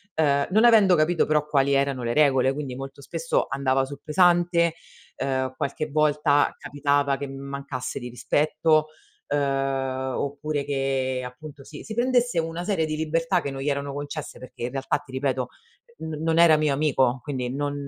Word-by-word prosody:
ehm, 140 -3 +2
non 215 +4 +4
avendo 210 -6 +6
capito 165 +2 +2
però 150 -1 +1
quali 140 -2 +2
erano 135 -2 +1
le 120 - -1
regole. 135 -3 +4
Quindi 140 -3 -5
molto 135 +1 -8
spesso 165 +3 -1
andava 135 -1 +1
sul 140 +1 -10
pesante, 170 0 +3 0.4
ehm, 130 -1 -2
qualche 140 +3 -3
volta 150 -1 +2
capitava 145 -1 0
che 140 - -5
mi 135 0 -8
mancasse 140 -1 -5
di 125 - -7
rispetto, 155 +5 +1 0.4
ehm, 135 -2 -1
oppure 145 +1 -3
che 135 -2 -1
appunto 140 +3 -10
si 150 +2 -11
si 220 - -7
prendesse 245 -4 +1
una 165 +1 -3
serie 180 -6 0
di 155 - -3
libertà 165 +3 0
che 140 - -4
non 135 0 -6
gli 145 - -1
erano 140 0 -2
concesse 145 +1 -6
perché 130 -2 -10
in 120 - -2
realtà 135 +1 -1
ti 145 -2 -16
ripeto 130 -1 -1 0.5
n 160 -1 -5
non 165 0 +2
era 165 -2 +7
mio 150 -2 +1
amico 135 -3 +1
quindi 130 -4 -3
non 145 0 -2
145 Hz, 175 wpm, -25 LUFS, 135-155 Hz, 0.5 s, era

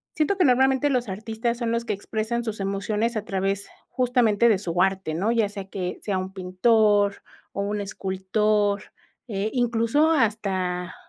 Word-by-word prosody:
siento 315 +6 +1
que 370 - +4
normalmente 265 +2 +3
los 250 -4 0
artistas 225 +4 -3
son 235 -2 -1
los 230 0 0
que - - -1
expresan 220 +4 -3
sus 220 -2 -4
emociones 210 +4 -1
a 210 - -2
través, 195 0 -2 0.2
justamente, 235 -3 +3
de 210 - +4
su 175 -2 -1
arte, 190 -4 0
¿no?, 200 +8 0
ya 225 -3 +2
sea 200 -2 -7
que 185 -2 -5
sea 200 -3 -1
un 185 +1 -4
pintor, 205 +2 +2 0.3
o - - -3
un 205 +1 -2
escultor, 200 +1 0 0.5
eh, 210 -1 -2
incluso 245 +5 +2
hasta 190 - 0
210 Hz, 160 wpm, -24 LUFS, 195-235 Hz, 0.5 s, que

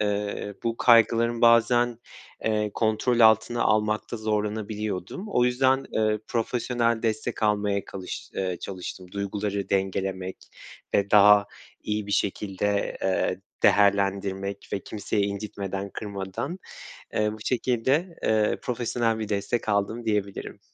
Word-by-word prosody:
Eee, 105 0 -2
bu 115 -1 -1
kaygılarım 115 0 +4
bazen, 120 0 +4 0.5
eee, 105 -1 +1
kontrol 115 +2 +1
altına 110 +1 +5
almakta 110 +2 +1
zorlanabiliyordum. 105 - -3
O 125 -11 +2
yüzden, 130 +2 +2
eee, 110 -1 +1
profesyonel 115 0 0
destek 110 0 -2
almaya 105 -1 +1
kalış 95 -2 -7
eee, 90 -2 -2
çalıştım. 90 -1 -7
Duyguları 100 0 -3
dengelemek 95 -1 -1 0.6
ve 100 0 +2
daha 105 0 +7 0.4
iyi 105 -1 -2
bir 100 - -3
şekilde, 100 0 -1
eee, 95 -1 0 0.2
değerlendirmek 100 -1 +2
ve - - 0
kimseyi 105 +1 -2
incitmeden, 100 -1 -4
kırmadan, 100 - -5 0.6
eee, 105 0 +1
bu - - -7
şekilde, 130 +8 0
eee, 110 -1 +2
profesyonel 120 -2 -1
bir 110 -2 -4
destek 105 +3 -2
aldım 105 +3 0
diyebilirim. 105 -3 -2
105 Hz, 115 wpm, -26 LUFS, 100-115 Hz, 0.6 s, daha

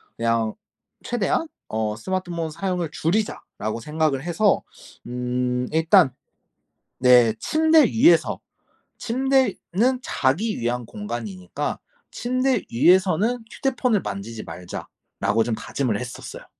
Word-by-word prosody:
그냥 115 -1 0 0.5
'최대한 240 +7 0 0.2
어 110 -1 -2
스마트폰 175 - -3
사용을 180 0 -2
줄이자.'라고 165 - -2
생각을 150 0 0
해서 180 +5 +2 0.4
음 125 0 -1
일단 160 -2 +4 0.9
네 125 -3 +6
침대 315 0 +4
위에서 265 +10 +4 0.6
침대는 255 -2 +1
자기 190 - 0
위한 120 +1 -1
공간이니까 105 -4 -5 0.3
'침대 255 +2 0
위에서는 190 - +3
휴대폰을 250 -6 0
만지지 105 +2 -6
말자.'라고 105 +4 -3
좀 115 0 -1
다짐을 120 -2 -2
했었어요. 125 0 -8
160 Hz, 250 characters per minute, -23 LUFS, -, 0.9 s, 네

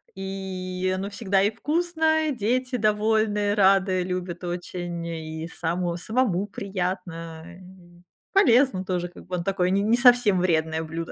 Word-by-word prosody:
и 185 -1 -4
оно 195 +2 -4
всегда 200 -3 +1
и 205 - +2
вкусно, 315 +4 0
и 280 - -2
дети 250 +4 -1
довольные, 210 -1 +1
рады, 190 -2 +3
любят 180 -1 -4
очень, 175 -1 -5
и 160 -1 -5
само 170 +1 -2
самому 205 -1 0
приятно. 180 -6 -5 0.9
Полезно 260 - +4
тоже, 175 -1 -2
как 175 - -14
бы 180 - -3
он 170 - -3
такой 185 -1 0
не 195 +1 +2
не 225 +3 +3
совсем 240 -6 +5
вредное 160 -3 +1
блюдо. 165 +1 -5
190 Hz, 140 wpm, -25 LUFS, 175-220 Hz, 0.9 s, совсем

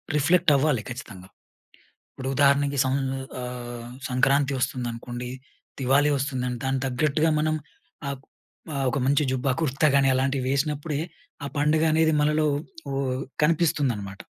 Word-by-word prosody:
Reflect 170 +2 +4
అవ్వాలి 135 -5 +2
ఖచ్చితంగా. 100 -7 -8 0.9
ఇప్పుడు 130 0 -5
ఉదాహరణకి 140 0 +3
సం 130 - +1 0.5
ఆహ్, 120 -1 -6 0.2
సంక్రాంతి 135 +2 +2
వస్తుందనుకోండి, 120 0 -3 0.5
దివాళీ 140 +3 +3
వస్తుంది. 130 -2 -2
దానికి 135 0 0
తగ్గట్టుగా 155 +4 +1
మనం, 155 +1 +1 0.5
ఆ - - -1 0.6
ఆహ్, 135 -1 0
ఒక 140 - -1
మంచి 140 +2 +3
జుబ్బా, 130 0 0
కుర్తా 150 +1 +2
కాని 135 -1 +4
అలాంటివి 130 0 0
వేసినప్పుడే, 145 +1 -1 0.4
ఆ 140 - -3
పండుగ 150 +2 +3
అనేది 160 0 +3
మనలో 150 +1 +2 0.5
ఓహ్, 135 -1 -1 0.2
కనిపిస్తుందనమాట. 140 - 0
135 Hz, 120 wpm, -25 LUFS, 125-150 Hz, 0.9 s, Reflect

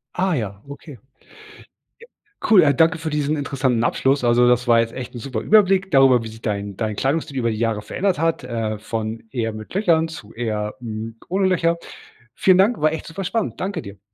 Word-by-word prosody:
Ah 185 0 +1
ja, 100 -7 -4
okay. 140 +1 -10 1.5
Ja, - - -3
cool. 175 -10 +6
Danke 160 +3 +3
für 160 0 -4
diesen 150 0 0
interessanten 135 -5 0
Abschluss. 135 +2 +1
Also, 120 0 +4
das 125 0 +2
war 115 -1 +5
jetzt 115 0 -1
echt 125 -2 -7
'n 120 - -7
super 115 -2 -4
Überblick 195 - +3
darüber, 135 -4 +5
wie - - -6
sich 110 +1 -13
dein 100 -3 -3
dein 110 -2 -2
Kleidungsstil 140 +3 -1
über 115 -2 0
die 110 - -4
Jahre 115 -2 -1
verändert 185 - -1
hat, 165 -3 0
äh, 115 -3 -3
von 110 +1 -4
eher 115 -3 -2
mit 110 0 -9
Löchern 170 -5 +2
zu 120 -10 -11
eher, 105 -2 -3
hm, 115 -1 -6
ohne 190 +1 +1
Löcher. 170 -2 +1 0.6
Vielen 185 -1 +4
Dank, 205 +5 +3
war 155 +1 +2
echt 160 - -5
super 180 +4 -6
spannend. 225 +3 -2
Danke 190 -3 -3
dir. 100 -5 -11
130 Hz, 200 wpm, -21 LUFS, 115-165 Hz, 1.5 s, cool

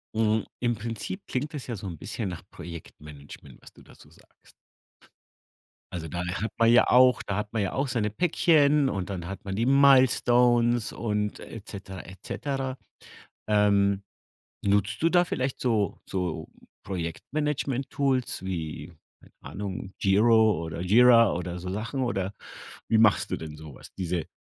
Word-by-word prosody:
Mhm, 110 -1 +1
im 120 -1 0
Prinzip 115 - -6
klingt 145 +5 -3
das 140 - -6
ja 120 - -4
so 100 -1 -7
'n 85 -4 -6
bisschen 105 +2 -4
nach 90 -2 -7
Projektmanagement, 75 -5 -11
was - - -16
du - - -18
da - - -18
so - - -19
sagst. - - -23 1.4
Also 85 -2 -4
da, 85 +3 -4
äh, 90 0 -3
hat 110 +3 -3
man 115 0 +5
ja 120 - +6
auch 125 -1 +5
da 100 - -4
hat 105 +1 -4
man 110 - 0
ja 95 - -2
auch 135 +1 0
seine 115 -4 -1
Päckchen 150 - +3
und 95 -3 -3
dann 90 -3 -5
hat 95 +1 -8
man 95 -1 -3
die 115 +4 0
Milestones 125 -4 +4
und 105 -2 -2
et 105 -3 -10
cetera, 95 -2 -8
et 95 +1 -12
cetera. 135 0 -3 0.7
Ähm, 100 -2 +3 0.6
nutzt 100 +3 +1
du 165 - +5
da 175 +1 +4
vielleicht 130 -5 -2
so 110 -6 0
so 90 -4 -3 0.4
Projektmanagementtools 135 - -2
wie, 80 -3 -5 0.3
keine - - -21
Ahnung, 95 -1 -6
Giro 110 -1 +4
oder 80 +2 -5
Gira 115 +3 +6
oder 90 0 -4
so 90 +1 -7
Sachen 115 +7 -3
oder 100 -6 -1 0.6
wie 110 - +3
machst 110 -1 +3
du - - +1
denn 80 -1 -8
so 75 -2 -11
was, - - -14
diese 90 -3 -3
105 Hz, 160 wpm, -27 LUFS, 95-125 Hz, 1.4 s, ja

